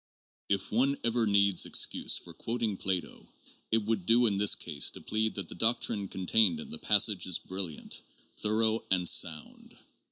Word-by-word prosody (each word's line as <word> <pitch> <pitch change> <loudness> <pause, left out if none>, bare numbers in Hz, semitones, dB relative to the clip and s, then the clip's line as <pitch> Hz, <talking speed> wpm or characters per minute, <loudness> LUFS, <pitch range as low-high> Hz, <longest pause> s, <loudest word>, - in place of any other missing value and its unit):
IP 100 -1 -1
one 135 +5 +1
ever 115 -1 0
needs 100 -2 +3
excuse - - +1
for 85 - -10
quoting 115 +3 -3
Plato, 95 -2 -4 0.4
it 110 -1 +1
would 105 -5 -2
do 120 +2 +4
in 100 -4 0
this 105 0 +5
case 75 -4 0
to - - -8
plead 110 0 -2
that 100 -4 -5
the - - -7
doctrine 110 0 +2
contained 110 - +1
in 225 -1 -9
the 235 - -5
passage 105 - +2
is 90 - +1
brilliant, 95 -5 -4 0.3
thorough, 110 +1 0
and 90 -2 +1
sound. 80 -3 -1
105 Hz, 165 wpm, -29 LUFS, 95-115 Hz, 0.4 s, this